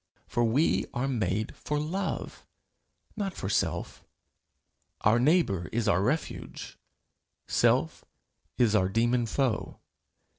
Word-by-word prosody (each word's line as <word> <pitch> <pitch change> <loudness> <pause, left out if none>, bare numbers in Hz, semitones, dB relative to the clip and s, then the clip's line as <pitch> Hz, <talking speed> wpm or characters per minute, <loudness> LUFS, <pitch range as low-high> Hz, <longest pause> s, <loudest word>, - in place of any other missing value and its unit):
For 120 - 0
we 125 +8 +2
are 125 +3 0
made 110 -4 -1
for 150 - -3
love, 185 +6 -3 0.7
not 200 -4 -3
for 95 - -4
self. - - -1 1.0
Our 110 +3 +4
neighbour 125 - +2
is 115 -1 -1
our 85 - +3
refuge; 140 +10 -3 0.7
self - - +2 0.5
is 115 -4 +3
our 95 -3 +3
demon 120 +3 +1
foe. 130 -1 -1
120 Hz, 110 wpm, -28 LUFS, 105-150 Hz, 1.0 s, Our